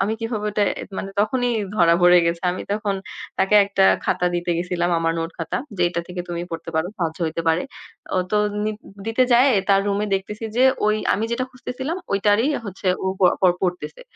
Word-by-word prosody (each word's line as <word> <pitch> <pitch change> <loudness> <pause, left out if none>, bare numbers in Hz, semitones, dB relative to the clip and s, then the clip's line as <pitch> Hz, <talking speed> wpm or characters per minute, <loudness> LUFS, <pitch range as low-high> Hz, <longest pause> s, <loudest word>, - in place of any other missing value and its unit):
আমি 210 +3 0
কিভাবে 225 -2 -3
ওটা 210 0 0 0.4
মানে 195 - -5
তখনই 245 +4 +1 0.3
ধরা 170 -3 +5
পড়ে 175 0 +7
গেছে। 170 0 -1
আমি 185 - -5
তখন 205 -1 -1 0.4
তাকে 190 +2 +2
একটা 195 -1 +1 0.2
খাতা 180 - +1
দিতে 175 0 -1
গেছিলাম 175 0 -1
আমার 165 0 +1
নোট 165 +1 -3
খাতা, 165 - -3 0.2
যে 180 - +1
এটা 170 -1 -2
থেকে 180 0 -5
তুমি 170 0 -3
পড়তে 165 0 -6
পারো। 160 +2 +1
সাহায্য 165 -3 -2
হইতে 165 +1 -3
পারে। 165 +2 +2 0.5
ও - - +3
তো 210 - +2 0.3
নি 215 - 0 0.4
দিতে 225 +3 +2
যায়ে 255 +3 +6 0.2
তার 195 0 +5
রুমে 205 +1 0
দেখতেছি 210 +3 -4
যে 255 - +4 0.2
ওই 215 0 +3 0.2
আমি 220 - -1
যেটা 255 +2 0
খুঁজতেছিলাম 260 +5 -5 0.2
ঐটারই 205 +5 +3 0.2
হচ্ছে 195 0 -7 0.2
ও - - 0 0.4
পড় 180 -2 +5
পড়তেছে। 180 - -3
195 Hz, 190 wpm, -22 LUFS, 175-215 Hz, 0.5 s, পড়ে